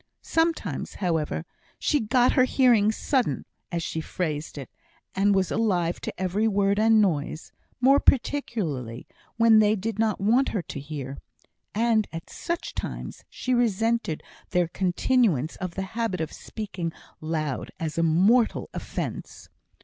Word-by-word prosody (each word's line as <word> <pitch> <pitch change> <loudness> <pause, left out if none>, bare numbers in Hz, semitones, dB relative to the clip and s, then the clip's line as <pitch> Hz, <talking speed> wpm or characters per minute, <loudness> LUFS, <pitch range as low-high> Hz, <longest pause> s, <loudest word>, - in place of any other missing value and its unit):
Sometimes, 325 0 -1
however, 165 -3 -1 0.3
she 295 - +1
"got 245 +2 +3
her 255 - +4
hearing 240 -6 +4
sudden," 255 +3 0 0.3
as 170 -1 -2
she 160 - -3
phrased 155 -3 -3
it, 135 - -6 0.5
and 200 +1 +3
was 190 -2 +1
alive 180 -6 0
to - - -3
every 190 +4 +1
word 200 -1 +2
and 220 0 +5
noise, 160 -5 0 0.3
more 270 +3 +5
particularly 175 - 0 0.3
when 230 -1 +6
they 215 0 +4
did 215 +1 -4
not 220 -2 +1
want 235 +7 +3
her 200 -6 -2
to 140 - -7
hear; 140 -2 -6 0.6
and 225 -1 +2
at 165 0 -8
such 340 0 -4
times - - -6
she 255 - -2
resented 230 -6 +1 0.3
their 180 -2 +2
continuance 180 - +1
of 180 -3 -5
the 190 - -2
habit 225 -6 -1
of 160 - -3
speaking 190 -6 -5 0.3
loud 155 -3 -3
as 160 0 -3
a - - +3
mortal 190 +9 +3
offence. - - -5
200 Hz, 140 wpm, -26 LUFS, 165-230 Hz, 0.6 s, when